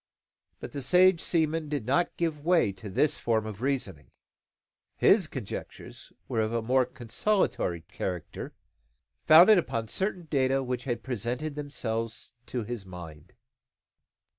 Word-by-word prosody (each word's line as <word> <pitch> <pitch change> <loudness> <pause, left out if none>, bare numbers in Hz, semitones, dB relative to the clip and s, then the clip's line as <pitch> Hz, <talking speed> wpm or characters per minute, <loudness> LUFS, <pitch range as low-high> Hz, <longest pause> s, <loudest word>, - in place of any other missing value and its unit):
But - - -8
the 140 - -5
sage 180 +5 +5
seaman 160 -2 0
did 145 -7 -2
not 155 +8 +1
give 160 -4 -2
way 170 - +3
to 100 +2 -9
this 145 +10 +1
form 110 -2 0
of 110 -1 -7
reasoning. 125 - -2 0.9
His - - +4
conjectures - - -8 0.2
were 110 - 0
of 110 0 -1
a 115 -1 -1
more 130 +2 +2
consolatory 120 - -1
character, 90 +1 -6 0.7
founded 180 +6 +9
upon 115 -9 -3
certain 190 - -2
data 135 -3 +1
which 125 0 -3
had 120 -3 -3
presented 125 +5 -3
themselves 115 -6 -4
to 125 -3 -3
his 115 -1 -5
mind. 85 -5 -11
125 Hz, 135 wpm, -28 LUFS, 110-155 Hz, 0.9 s, founded